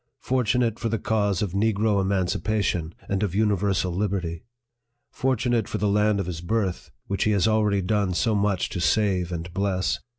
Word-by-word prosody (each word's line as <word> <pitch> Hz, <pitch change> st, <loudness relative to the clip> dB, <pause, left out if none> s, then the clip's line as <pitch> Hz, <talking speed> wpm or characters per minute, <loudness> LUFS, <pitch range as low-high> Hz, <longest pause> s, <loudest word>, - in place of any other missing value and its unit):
fortunate 125 Hz, -2 st, +1 dB
for 115 Hz, -, -1 dB
the 115 Hz, -, 0 dB
cause 105 Hz, -3 st, 0 dB
of 100 Hz, -, -2 dB
negro 105 Hz, +1 st, +1 dB
emancipation, 95 Hz, -2 st, -1 dB
and 100 Hz, 0 st, -1 dB
of 100 Hz, -4 st, -1 dB
universal 100 Hz, -3 st, +1 dB
liberty! 90 Hz, -3 st, -2 dB, 0.7 s
fortunate 120 Hz, -4 st, 0 dB
for -, -, -2 dB
the 105 Hz, -, 0 dB
land 105 Hz, 0 st, +2 dB
of 95 Hz, -, -1 dB
his 85 Hz, -2 st, -5 dB
birth, 95 Hz, 0 st, -2 dB, 0.2 s
which 100 Hz, -, -1 dB
he -, -, +2 dB
has 100 Hz, +1 st, +2 dB
already 105 Hz, -3 st, +2 dB
done 100 Hz, 0 st, +1 dB
so 110 Hz, +5 st, +1 dB
much 100 Hz, -2 st, +1 dB
to 90 Hz, -, -4 dB
save 90 Hz, +1 st, +1 dB
and 85 Hz, 0 st, -5 dB
bless 95 Hz, -1 st, 0 dB
100 Hz, 170 wpm, -25 LUFS, 90-110 Hz, 0.7 s, land